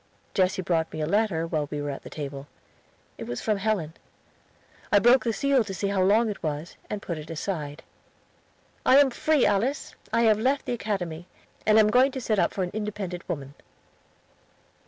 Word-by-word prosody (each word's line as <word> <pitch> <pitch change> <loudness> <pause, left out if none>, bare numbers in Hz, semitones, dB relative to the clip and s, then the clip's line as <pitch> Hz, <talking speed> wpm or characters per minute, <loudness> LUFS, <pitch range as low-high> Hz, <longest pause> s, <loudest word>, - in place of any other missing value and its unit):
Jesse 190 0 +1
brought 165 -2 0
me 155 - -6
a 155 - 0
letter 185 -2 +1
while 155 -3 -2
we 150 - -4
were 145 0 -3
at 135 - -7
the - - -10
table. 140 -1 -6 0.7
It 115 - -5
was 120 0 -4
from 215 -2 0
Helen. 195 -7 -1 1.0
I 205 - +6
broke 240 +4 +5
its 225 - 0
seal 275 -3 +3
to 195 -3 -6
see 200 +1 -1
how 200 -1 +1
long 210 +5 +4
it 210 - -5
was, 155 +1 -4
and 210 -1 -4
put 170 -3 -4
it 150 +1 -10
aside. 155 -3 -4 1.0
"I 260 - +6
am 280 -2 +6
free, 305 +2 +2
Alice. 240 +8 0 0.2
I 230 - +2
have 215 -2 +4
left 270 +5 +1
the - - -2
Academy, 185 -7 -3 0.4
and 215 0 +6
am 215 -1 +5
going 255 +3 +5
to 265 - -3
set 220 -4 0
up - - +2
for 190 - -2
an 180 - -4
independent 205 -4 -5
woman." 140 -3 -4
195 Hz, 195 wpm, -26 LUFS, 160-220 Hz, 1.0 s, I